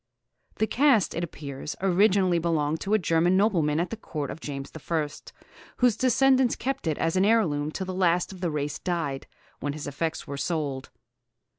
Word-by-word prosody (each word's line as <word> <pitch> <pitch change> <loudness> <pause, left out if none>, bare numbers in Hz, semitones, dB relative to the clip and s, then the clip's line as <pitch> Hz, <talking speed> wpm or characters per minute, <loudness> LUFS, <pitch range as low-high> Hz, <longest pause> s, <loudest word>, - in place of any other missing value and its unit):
The 220 - +1
cast, 250 - +3
it 170 - -2
appears, 145 -3 -6
originally 190 -1 +3
belonged 160 -2 0
to 205 +2 +1
a - - +5
German 175 0 +2
nobleman 170 -8 +2
at 175 - -1
the - - -2
Court 150 -9 -5
of - - -8
James 140 -3 -6
I., 160 0 -1 0.7
whose 245 -4 +3
descendants 260 +1 +3
kept 270 -7 -3
it 155 - 0
as 165 - 0
an 185 - +3
heirloom 170 -10 +2
till 190 +4 -4
the 185 - -4
last 180 -1 +1
of 185 - -12
the 175 - 0
race 145 -1 -3
died, 165 -7 -3 0.3
when 145 - -3
his 150 0 -6
effects 160 +3 -3
were 140 -1 -6
sold. 145 -4 -2
170 Hz, 180 wpm, -26 LUFS, 150-200 Hz, 0.7 s, a